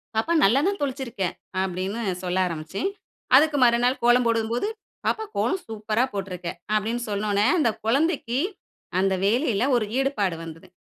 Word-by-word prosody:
"பாப்பா! 225 +10 +1
நல்லா 235 +8 +4
தான் 400 0 -1
தொளிச்சிருக்க." 255 -6 -3 0.4
அப்பிடின்னு 190 +4 -3 0.2
சொல்ல 180 0 -1
ஆரம்பிச்சேன், 170 - -3 0.5
அதுக்கு 300 0 +3
மறுநாள், 240 +2 +3
கோலம் 240 +1 +5
போடும்போது, 230 - 0 0.4
"பாப்பா! 440 - 0
கோலம் 380 - +1
சூப்பரா 220 +2 -1
போட்டிருக்க." 185 -3 -4 0.3
அப்பிடின்னு 230 +3 -1
சொன்னோடனே, 205 +1 +1
அந்த 235 -7 +3 0.2
குழந்தைக்கு 270 -2 +1 0.6
அந்த 190 0 +2
வேலையில 235 0 +2
ஒரு 220 - 0
ஈடுபாடு 215 -10 0
வந்தது, 165 +3 -10
225 Hz, 135 wpm, -24 LUFS, 195-255 Hz, 0.6 s, கோலம்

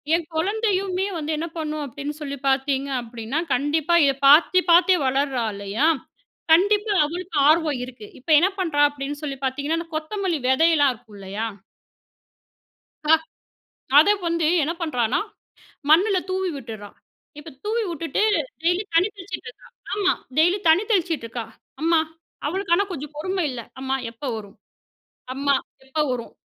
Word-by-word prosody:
என் 340 - -2
குழந்தையுமே 390 +1 0
வந்து 310 0 -3
என்ன 330 +2 -3
பண்ணும் 305 -1 -3
அப்பிடின்னு 285 +3 -6
சொல்லி 280 -1 -4
பார்த்தீங்க 270 +1 0
அப்பிடின்னா, 235 +4 -4
கண்டிப்பா 300 +5 +1
இத 275 - +3
பார்த்து, 325 +5 +7
பார்த்தே 355 +2 +6
வளர்றா 265 -2 0
இல்லயா! 200 +9 0 0.7
கண்டிப்பா 410 +4 +3
அவளுக்கு 345 +1 -5
ஆர்வம் 310 -4 +2
இருக்கு. 245 -4 -11
இப்ப 260 - -15
என்ன 365 +4 +3
பண்றா? 320 -6 +1
அப்பிடின்னு 285 +1 -6
சொல்லி 275 -2 -4
பார்த்தீங்கன்னா, 285 +5 -1
அந்த 335 0 -8
கொத்தமல்லி 345 +1 -2
விதையெல்லாம் 290 -1 +4
இருக்கு 215 -1 -18
இல்லயா! 200 +3 -4 1.6
ஆ, - - +8 0.9
அத 320 - +5 0.2
வந்து 335 -2 +1 0.2
என்ன 320 +4 -1
பண்றான்னா, 250 -8 0 0.7
மண்ல 375 +6 +5
தூவி 375 0 -1
விட்டுட்றா! 220 -6 -8 0.5
இப்ப 310 +2 -11
தூவி 450 +2 0
விட்டுட்டு 330 +2 -2 0.4
டெய்லி 355 +4 +2
தண்ணி 345 +5 +4
தெளிச்சிட்டுருக்கா! 360 - -9 0.3
ஆமா 395 -3 +2 0.2
டெய்லி 350 +5 +4
தண்ணி 330 +6 +5
தெளிச்சிட்டுருக்கா! 310 - -1 0.4
அம்மா! 330 0 +3 0.5
அவளுக்கு 380 +3 -1
ஆனா 400 - +2
கொஞ்சம் 300 -3 -6
பொறும 370 +4 -2
இல்ல. 250 -2 -5 0.2
"அம்மா 265 0 -1 0.2
எப்ப 230 +5 -10
வரும்? 205 -3 -9 0.8
அம்மா 280 +1 +1 0.3
எப்போ 270 +4 -3
வரும்?" 240 -2 -6
310 Hz, 135 wpm, -23 LUFS, 265-355 Hz, 1.6 s, ஆ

